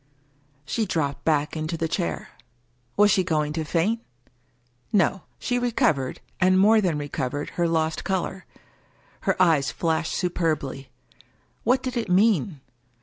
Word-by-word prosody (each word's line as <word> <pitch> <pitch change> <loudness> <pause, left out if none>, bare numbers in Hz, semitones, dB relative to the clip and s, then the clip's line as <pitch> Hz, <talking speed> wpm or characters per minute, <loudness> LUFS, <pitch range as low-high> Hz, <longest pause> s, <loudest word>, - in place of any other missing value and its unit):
She 225 -3 -1
dropped 145 -6 -2
back 150 -1 +1
into 155 +1 -3
the 165 0 -1
chair. 85 - -3 0.7
Was 205 0 +6
she 190 - +3
going 150 -3 0
to 160 0 -2
faint? 175 +9 0 0.9
No: 190 -1 +2 0.2
she 245 -1 -1
recovered, 190 - 0 0.2
and 185 0 +4
more 215 +3 +5
than 175 -6 0
recovered, 145 -1 -3
her 170 -1 0
lost 160 -1 0
color. 190 0 -3 0.8
Her - - +1
eyes 160 -6 +4
flashed 160 -1 -1
superbly. 155 -6 -2 0.7
What 250 +4 +2
did 255 -2 -3
it 230 -5 -2
mean 185 - +2
165 Hz, 135 wpm, -25 LUFS, 150-195 Hz, 0.9 s, Was